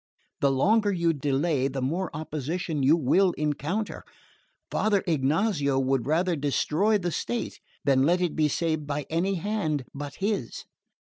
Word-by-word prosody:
The 140 Hz, -, +3 dB
longer 205 Hz, +10 st, +3 dB
you 170 Hz, -3 st, +1 dB
delay 140 Hz, 0 st, 0 dB
the 135 Hz, 0 st, -4 dB
more 165 Hz, +8 st, -1 dB
opposition 155 Hz, +1 st, -3 dB
you 145 Hz, +5 st, +5 dB
will 175 Hz, +5 st, +3 dB
encounter. 155 Hz, +8 st, -2 dB, 0.7 s
Father 205 Hz, -3 st, +1 dB
Ignazio 150 Hz, -1 st, +1 dB
would 135 Hz, -2 st, 0 dB
rather 170 Hz, +3 st, +2 dB
destroy 155 Hz, +8 st, +1 dB
the 175 Hz, -3 st, -2 dB
state 240 Hz, +7 st, -3 dB, 0.3 s
than 135 Hz, -2 st, +4 dB
let 170 Hz, +6 st, +3 dB
it 180 Hz, -3 st, -1 dB
be 155 Hz, -1 st, +3 dB
saved 155 Hz, 0 st, -1 dB
by 145 Hz, -1 st, -2 dB
any 185 Hz, +4 st, +1 dB
hand 175 Hz, -7 st, -1 dB
but 140 Hz, 0 st, -6 dB
his." 195 Hz, -, -3 dB
155 Hz, 145 wpm, -26 LUFS, 140-185 Hz, 0.7 s, you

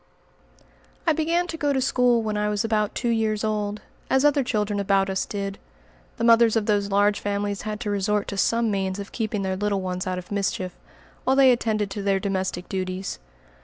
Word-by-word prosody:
I 325 Hz, -, +4 dB
began 330 Hz, +3 st, +1 dB
to 330 Hz, -2 st, -6 dB
go 290 Hz, -2 st, +1 dB
to 265 Hz, -, +1 dB
school 245 Hz, -2 st, +2 dB
when 215 Hz, -1 st, -2 dB
I 210 Hz, 0 st, 0 dB
was 210 Hz, +1 st, 0 dB
about 215 Hz, -2 st, 0 dB
two 240 Hz, -, -1 dB
years 220 Hz, -2 st, 0 dB
old, 210 Hz, -1 st, -2 dB, 0.3 s
as 265 Hz, +2 st, +3 dB
other 290 Hz, -1 st, +4 dB
children 210 Hz, -4 st, -1 dB
about 195 Hz, -1 st, +2 dB
us 190 Hz, -, -1 dB
did. 200 Hz, -1 st, -4 dB, 0.6 s
The -, -, -3 dB
mothers 230 Hz, -1 st, +5 dB
of 220 Hz, -2 st, +1 dB
those 205 Hz, -2 st, +1 dB
large 205 Hz, +1 st, +3 dB
families 205 Hz, 0 st, -2 dB
had 210 Hz, 0 st, -4 dB
to 210 Hz, -3 st, -2 dB
resort 205 Hz, +1 st, 0 dB
to 200 Hz, -, -5 dB
some 230 Hz, +2 st, +2 dB
means 190 Hz, -1 st, -1 dB
of 200 Hz, 0 st, -7 dB
keeping 215 Hz, -3 st, -2 dB
their 190 Hz, 0 st, -1 dB
little 200 Hz, 0 st, -1 dB
ones 185 Hz, 0 st, -3 dB
out 185 Hz, 0 st, -1 dB
of 180 Hz, +2 st, -8 dB
mischief, 190 Hz, -2 st, -2 dB, 0.5 s
while 265 Hz, -, +2 dB
they 270 Hz, -1 st, +7 dB
attended 215 Hz, -4 st, 0 dB
to 205 Hz, -, -4 dB
their 195 Hz, -1 st, +1 dB
domestic 190 Hz, -2 st, -2 dB
duties. 185 Hz, -, -4 dB
210 Hz, 200 wpm, -24 LUFS, 195-230 Hz, 0.6 s, they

